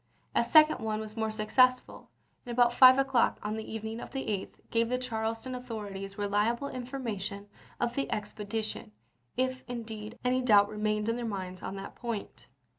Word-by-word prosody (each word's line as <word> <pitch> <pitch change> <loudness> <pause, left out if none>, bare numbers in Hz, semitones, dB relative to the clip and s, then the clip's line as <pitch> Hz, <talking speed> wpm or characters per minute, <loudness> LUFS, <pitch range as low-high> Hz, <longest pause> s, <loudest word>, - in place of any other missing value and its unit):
A - - +3
second 310 -1 +6
one 215 -1 -2
was 215 0 -7
more 220 -1 -1
successful, 250 +4 +2 0.3
and 245 - -7
about 240 0 +4
5 255 +1 +9
o'clock 270 -3 +3
on 210 +1 -2
the 220 0 -6
evening 220 +1 -4
of - - -7
the 270 - -3
8th 200 -3 -3 0.2
gave 230 0 +2
the 250 - +1
Charles 225 -2 -3
ton 260 - -5
authorities 205 -5 -6
reliable 210 +6 0
information 230 -6 -5 0.3
of 235 - 0
the 275 +2 -1
expedi 210 +1 -3
tion, 210 - -6 0.4
if, 260 0 0
indeed, 225 -2 -6
any 255 +1 +2
doubt 205 -5 +5
remained 210 0 -1
in 230 +1 0
their 245 - -4
minds 190 -4 -4
pp - - -7
ao,"2i. - - -2
on 195 - -5
that 195 0 -7
point. 230 -4 -6
225 Hz, 190 wpm, -30 LUFS, 210-250 Hz, 0.4 s, 5